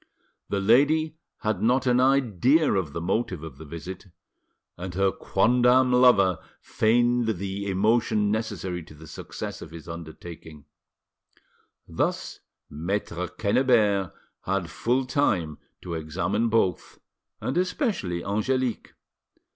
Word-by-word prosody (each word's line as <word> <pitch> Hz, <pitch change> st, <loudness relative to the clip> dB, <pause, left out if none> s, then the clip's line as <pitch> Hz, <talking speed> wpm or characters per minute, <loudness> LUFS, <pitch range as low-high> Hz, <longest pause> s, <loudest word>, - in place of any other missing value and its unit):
The 100 Hz, -, 0 dB
lady 150 Hz, +9 st, +3 dB, 0.2 s
had 105 Hz, -3 st, -1 dB
not 125 Hz, +3 st, +2 dB
an 125 Hz, -1 st, +3 dB
idea 135 Hz, -, +3 dB
of 95 Hz, -7 st, -1 dB
the 85 Hz, -, -5 dB
motive 90 Hz, -2 st, -1 dB
of 75 Hz, -5 st, -9 dB
the 80 Hz, -, -9 dB
visit, 85 Hz, +5 st, -8 dB, 0.7 s
and 90 Hz, 0 st, -7 dB
her 95 Hz, 0 st, +2 dB
quondam 125 Hz, +7 st, +3 dB
lover 100 Hz, -9 st, +5 dB, 0.2 s
feigned 120 Hz, -1 st, +1 dB
the 100 Hz, +2 st, -4 dB
emotion 105 Hz, +1 st, +2 dB
necessary 95 Hz, -5 st, -3 dB
to 75 Hz, -, -14 dB
the 80 Hz, +2 st, -13 dB
success 75 Hz, -, -7 dB
of -, -, -9 dB
his 80 Hz, 0 st, -11 dB
undertaking. 80 Hz, -2 st, -10 dB, 1.2 s
Thus -, -, -2 dB, 0.3 s
Maitre 90 Hz, +2 st, -3 dB
Quennebert 105 Hz, -, +2 dB, 0.3 s
had 95 Hz, -4 st, -1 dB
full 125 Hz, +3 st, 0 dB
time 100 Hz, -, 0 dB, 0.2 s
to 85 Hz, -, -5 dB
examine 95 Hz, +8 st, -1 dB
both, 105 Hz, -6 st, 0 dB, 0.4 s
and 130 Hz, -, -3 dB
especially 180 Hz, -, -1 dB
Angelique. 120 Hz, +4 st, -1 dB
100 Hz, 115 wpm, -26 LUFS, 90-125 Hz, 1.2 s, lover